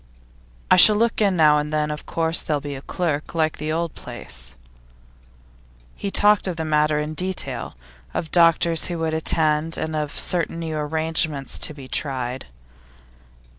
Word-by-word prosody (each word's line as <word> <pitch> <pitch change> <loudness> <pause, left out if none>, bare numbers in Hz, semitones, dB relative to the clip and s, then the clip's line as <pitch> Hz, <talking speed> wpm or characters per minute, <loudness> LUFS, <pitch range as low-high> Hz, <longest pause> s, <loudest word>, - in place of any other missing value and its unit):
'I - - +7
shall 210 +4 +9
look 230 +1 +1
in 200 -3 +3
now 150 -3 +5
and 150 +1 -4
then, 150 0 0
of 150 - -7
course; 165 0 +2
there'll 150 -2 -1
be 145 0 -6
a 135 - -7
clerk, 155 -1 -3
like 160 -1 +1
at - - -14
the 155 +1 -3
old 165 0 -2
place.' 60 0 -9 1.4
He 200 - -4
talked 205 0 +3
of 180 - -2
the 160 -1 -4
matter 150 -1 +2
in 150 +1 -3
detail 185 - -3 0.4
of - - -3
the 160 - -16
doctors 165 -1 +4
who 175 - -4
would 160 -1 -2
attend, 160 0 +1
and 160 0 -3
of 150 -1 -2
certain 170 +1 -2
new 165 -2 -4
arrangements 155 -1 -1
to 155 - -3
be 135 -3 -10
tried. 130 -2 -3
155 Hz, 170 wpm, -22 LUFS, 150-165 Hz, 1.4 s, shall